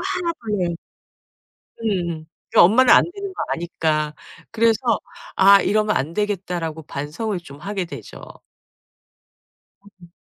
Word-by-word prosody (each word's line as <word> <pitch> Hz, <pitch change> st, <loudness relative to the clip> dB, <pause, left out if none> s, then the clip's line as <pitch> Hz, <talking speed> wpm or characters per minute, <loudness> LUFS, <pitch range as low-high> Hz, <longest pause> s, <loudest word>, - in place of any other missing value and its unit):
1 350 Hz, -2 st, -1 dB
더 210 Hz, -, -3 dB
해." 170 Hz, -1 st, -1 dB, 1.1 s
음. 170 Hz, -7 st, -2 dB, 0.3 s
그 -, -, +5 dB
엄마는 230 Hz, +9 st, +6 dB
안 -, -, +8 dB
되는 400 Hz, -1 st, -6 dB
거 -, -, -3 dB
아니까 155 Hz, -3 st, -1 dB, 0.4 s
그래서 230 Hz, -1 st, +2 dB, 0.6 s
'아 195 Hz, +1 st, +7 dB
이러면 215 Hz, 0 st, +1 dB
안 150 Hz, +5 st, -2 dB
되겠다.'라고 180 Hz, -6 st, -3 dB
반성을 155 Hz, +9 st, -4 dB
좀 140 Hz, -4 st, -13 dB
하게 195 Hz, +3 st, -3 dB
되죠. 175 Hz, -, -10 dB, 1.6 s
음. 195 Hz, -4 st, -18 dB
190 Hz, 210 characters per minute, -21 LUFS, 165-215 Hz, 1.6 s, 안